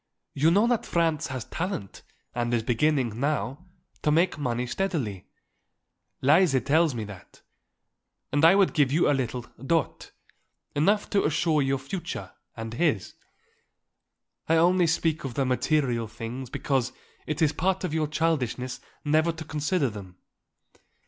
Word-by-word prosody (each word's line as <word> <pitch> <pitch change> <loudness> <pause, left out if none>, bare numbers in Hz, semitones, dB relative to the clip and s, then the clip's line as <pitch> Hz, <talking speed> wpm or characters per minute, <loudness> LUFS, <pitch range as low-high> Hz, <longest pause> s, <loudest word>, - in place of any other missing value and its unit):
"You 150 +4 +3
know 200 +6 +4
that 240 -1 +1
Franz 165 -3 +1
has 130 -4 -5
talent 170 - -4 0.3
and 120 -1 -1
is 115 - 0
beginning, 120 -1 +1
now, 145 +3 -2 0.3
to - - +1
make 165 +5 +3
money 125 -4 -2
steadily. 125 - -3 1.0
Lise 150 0 +5
tells 155 0 +3
me 110 - -3
that. 100 -3 -12 0.9
And 145 +3 +1
I 165 +4 +8
would 195 -2 +3
give 145 -5 +3
you 160 +4 +3
a - - +4
little 125 -2 -2 0.2
dot; 165 +1 -1 0.7
enough 200 +8 +2
to 200 - +3
assure 155 0 +2
your 135 0 +1
future, 140 +7 -6 0.3
and 115 0 -5
his. 140 - 0 1.4
I 165 - +5
only 175 +2 +4
speak 165 -1 0
of 135 -3 -5
the 135 - +1
material 125 -3 +1
things 115 +3 -7
because 130 -2 -1 0.4
it 155 - -2
is 155 -1 +3
part 190 +2 0
of 180 - -2
your 155 -1 +1
childishness 135 -6 -1 0.3
never 155 +3 +3
to 165 -1 -8
consider 150 +1 0
them. 95 -3 -10
145 Hz, 145 wpm, -26 LUFS, 125-165 Hz, 1.4 s, I